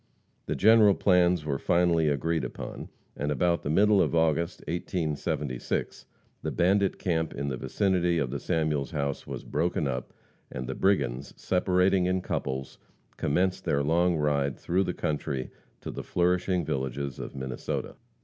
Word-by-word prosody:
The - - -1
general 110 -2 +6
plans 90 -4 +3
were 70 -3 -1
finally 85 -2 +2
agreed 80 +3 0
upon, - - -6 0.3
and 75 +1 -2
about 85 +2 +1
the - - -4
middle 100 +5 +4
of - - +1
August, 80 +1 +1
1876, 75 -6 -3 0.3
the - - -2
bandit 95 +3 +2
camp 80 -3 -1
in 70 0 -2
the 65 - -2
vicinity 90 - +1
of 65 -6 -1
the - - -3
Samuels 75 -3 0
house 70 -4 -3
was - - -6
broken 85 -3 -1
up, 65 -1 -4 0.4
and 65 0 -5
the 65 - -3
brigands, 70 -8 0
separating 90 0 +2
in 95 0 +1
couples, 65 -5 -4 0.4
commenced 90 +5 0
their 70 - +1
long 85 +4 +2
ride 70 -3 0
through 95 +3 0
the - - -3
country 70 -3 -2 0.3
to - - -5
the - - -5
flourishing 90 0 +1
villages 65 0 -3
of - - -7
Minnesota. 65 -1 -4
80 Hz, 150 wpm, -28 LUFS, 70-90 Hz, 0.4 s, general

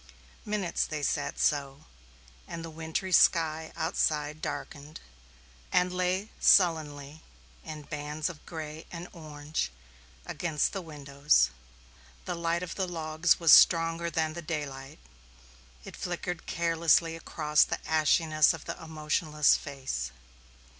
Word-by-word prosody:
Minutes 205 -5 -1
they 150 -2 -4
sat - - -1
so, 140 0 0 0.6
and 165 -1 -6
the 165 - -8
wintry 160 +4 -4
sky 160 -3 +3
outside 155 -2 -1
darkened 150 +1 -6 0.7
and 180 0 +2
lay 185 +3 -1
sullenly 155 -4 +3 0.4
in 155 -1 -8
bands 150 +2 -4
of 175 -5 -8
gray 160 -1 -7
and 175 0 -7
orange 155 - -4 0.5
against 160 -4 -1
the 195 - -3
windows; 140 - +1 0.7
the - - -2
light 170 +1 -1
of 175 - -5
the 190 -2 -2
logs 160 0 +1
was 165 -3 +6
stronger 165 0 +5
than 160 -2 -1
the 170 - -6
daylight; 145 -4 -5 0.9
it - - -10
flickered 175 -1 -5
carelessly 165 0 +2
across 150 -2 +2
the - - -2
ashiness 155 0 +3
of 160 - -12
the - - -6
emotionless 150 -1 +1
face. 135 - -4
160 Hz, 120 wpm, -29 LUFS, 150-170 Hz, 0.9 s, was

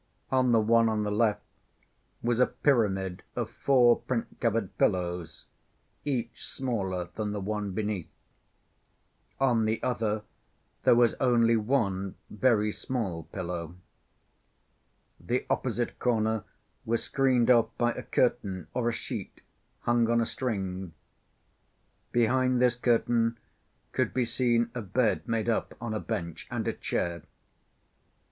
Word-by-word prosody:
On 130 -2 +3
the 115 - +5
one 115 +1 +4
on 110 -1 0
the 105 - -1
left 105 0 +1 0.8
was 120 0 +1
a 125 - +5
pyramid 95 -9 +1
of - - -2
four 125 -3 +4
print‐covered 115 -4 -1
pillows, 90 -3 0 0.6
each 120 -5 -2
smaller 95 -9 -2
than 105 -1 -3
the 105 - -2
one 105 +1 -2
beneath. 105 -4 -3 1.2
On 120 -5 +3
the 110 +1 0
other 110 -4 0 0.6
there - - +7
was 120 -1 +4
only 120 -3 +4
one 105 -5 0 0.2
very 105 -1 +2
small 100 -10 -3
pillow. 85 -3 -5 1.4
The - - -1
opposite - - -1
corner 110 -3 +1 0.4
was 115 +1 0
screened 130 -3 +3
off 115 -2 +5
by 120 0 +2
a 125 - -5
curtain 100 -10 0
or 120 -2 +1
a - - 0
sheet 115 - -6 0.4
hung 120 -1 +2
on 115 0 +3
a 115 - +2
string. 95 -7 -3 1.2
Behind 125 +2 +2
this 125 -1 +4
curtain 115 -1 +2 0.5
could - - -1
be 125 -2 +2
seen 120 0 +1
a 120 - -3
bed 110 +3 0
made 115 -1 0
up 115 - 0
on 115 -1 -4
a 110 - -1
bench 85 -4 -4
and - - -3
a - - +1
chair. 85 -1 -2
115 Hz, 130 wpm, -29 LUFS, 105-120 Hz, 1.4 s, there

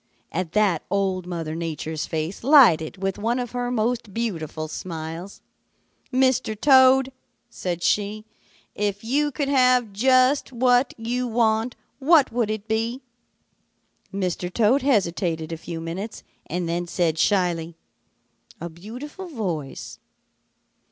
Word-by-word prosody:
"At 175 -2 -3
that 205 -7 +2
Old 190 -2 -1
Mother 165 -3 -4
Nature's 160 -1 -4
face 160 +6 -4
lighted 195 - +5
with 195 0 -1
one 230 +4 0
of 245 -2 -3
her 245 0 -2
most 235 -3 -1
beautiful 160 -9 -3
smiles. 165 +3 -7 0.7
'Mr. 255 -5 +1
Toad,' 265 -1 +6 0.4
said 175 -5 -4
she, 210 +2 0 0.5
'if 205 0 -2
you 290 +6 +1
could 285 0 -2
have 250 -5 +3
just 255 +6 +3
what 250 +1 +2
you 245 +2 -2
want, 225 0 +1 0.2
what 295 0 +4
would 230 -2 0
it 215 0 -4
be?' 230 +4 -1 1.1
"Mr. 180 -2 -2
Toad 235 +7 +3
hesitated 175 - 0
a - - -2
few 165 +1 -7
minutes 175 +7 -6 0.2
and 175 +1 -2
then 175 +1 -2
said 170 -3 0
shyly, 170 -3 +1 0.8
'A 170 - -5
beautiful 250 - -9
voice.' 180 - -5
210 Hz, 125 wpm, -24 LUFS, 170-250 Hz, 1.1 s, Toad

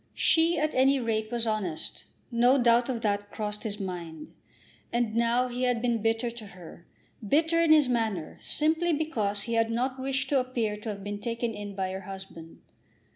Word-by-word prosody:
She 330 +1 +3
at 305 +1 0
any 270 +1 +4
rate 220 -2 -1
was 235 -1 0
honest. 210 -8 -2 0.3
No 245 +3 +4
doubt 240 0 +4
of 240 -3 -2
that 205 -2 -1
crossed 210 0 -4
his 210 -2 -3
mind. 170 -5 -6 0.6
And 235 -2 0
now 235 +2 +2
he 245 0 -5
had 250 -2 +2
been 235 -2 0
bitter 225 +2 0
to 230 -2 -9
her, 170 -1 -12 0.4
bitter 325 +9 +2
in 330 -2 +4
his 305 -3 +6
manner, 220 -9 -1
simply 320 +3 +1
because 220 -10 -1
he 235 - -3
had 225 0 +2
not 255 +3 -1
wished 270 0 -1
to 280 - +3
appear 240 -4 -1
to 210 +2 -6
have 200 -2 -5
been 205 0 -4
taken 230 0 -2
in 205 -1 -7
by 190 -1 -2
her 190 0 -5
husband. 190 -4 -10
230 Hz, 185 wpm, -28 LUFS, 205-255 Hz, 0.6 s, his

